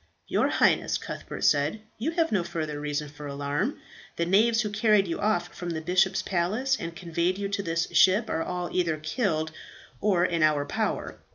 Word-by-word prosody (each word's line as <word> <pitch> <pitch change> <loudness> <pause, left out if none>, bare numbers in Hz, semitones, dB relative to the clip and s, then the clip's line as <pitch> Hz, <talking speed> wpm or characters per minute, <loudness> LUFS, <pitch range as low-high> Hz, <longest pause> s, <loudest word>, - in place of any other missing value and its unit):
"Your - - +2
Highness," - - +2
Cuthbert - - -7
said, 145 +9 +2 0.2
"you 260 +8 0
have 330 -1 +1
no 195 -5 +2
further 155 -3 -4
reason 150 0 -2
for 145 0 -9
alarm; 145 - -2 0.4
the 170 - 0
knaves 220 +5 +4
who 210 -3 -3
carried 210 -2 +3
you 170 - -3
off 190 -5 0
from 175 - -6
the 165 -2 -2
bishop's 180 +3 +2
palace 210 +9 0
and 165 0 -5
conveyed 170 +2 -1
you 200 0 -2
to 200 0 -1
this 165 -3 -1
ship 200 +4 +5
are 165 - -1
all 180 +1 -4
either 170 -4 +1
killed 160 -1 -1 0.5
or 185 -4 +3
in 170 -2 0
our 150 -2 +3
power. - - -2
175 Hz, 185 wpm, -27 LUFS, 155-205 Hz, 0.5 s, ship